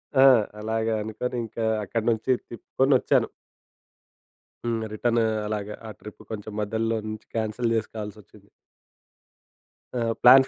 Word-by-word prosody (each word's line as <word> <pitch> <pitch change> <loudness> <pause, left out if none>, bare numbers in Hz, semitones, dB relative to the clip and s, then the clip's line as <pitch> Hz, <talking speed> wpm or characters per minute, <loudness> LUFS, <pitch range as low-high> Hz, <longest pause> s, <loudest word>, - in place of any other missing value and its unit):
ఆ! 135 0 +8 0.3
అలాగా 110 +1 0
అనుకోని 115 +3 -3
ఇంకా 115 +1 -4 0.2
అక్కడి 110 +3 -2
నుంచి 115 +3 +1 0.2
తిప్పుకొనొచ్చాను. 130 +3 +2 1.4
హ్మ్. 115 -1 0
రిటర్న్ 120 +2 +2 0.3
అలాగా 105 -1 -3
ఆ - - -6
ట్రిప్ 105 0 -11
కొంచెం 110 0 -5
మధ్యలో 110 +2 0
నుంచి 110 0 -6
క్యాన్సిల్ 115 +1 0
జేసుకోవాల్సొచ్చింది. 105 -2 -6 1.5
ఆ! - - 0 0.2
ప్లాన్ 130 +2 +9
110 Hz, 110 wpm, -26 LUFS, 110-120 Hz, 1.5 s, ప్లాన్